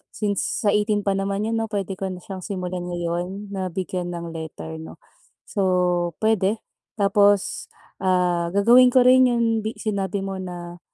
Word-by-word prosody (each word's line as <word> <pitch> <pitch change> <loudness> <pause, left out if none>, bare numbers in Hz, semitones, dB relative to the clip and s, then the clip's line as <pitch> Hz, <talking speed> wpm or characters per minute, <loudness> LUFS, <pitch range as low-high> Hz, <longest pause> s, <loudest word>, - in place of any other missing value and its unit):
since 205 0 -1
sa 205 - +4
18 210 0 +1
pa 200 - +1
naman 195 +1 -1
'yon, 225 +1 0
'no? 225 - -1
Puwede 195 -3 -4
ko 195 - -2
na 180 -1 -7
siyang 195 -1 -7
simulan 180 -2 -4
ngayon 175 +3 -4
na 190 -2 -2
bigyan 180 0 -3
ng 170 -1 -6
letter, 115 - -7
'no? 80 0 -9 0.5
So, - - -6 0.6
puwede. 215 0 +2 0.3
Tapos, 200 -1 +2 0.3
ah, 180 -2 +1
gagawin 240 +5 +7
ko 250 0 +5
rin 255 +1 +6
yung 235 -1 +1 0.3
sinabi 200 -2 -2
mo 195 -1 -4
na 175 -1 -7
195 Hz, 160 wpm, -23 LUFS, 180-210 Hz, 0.6 s, gagawin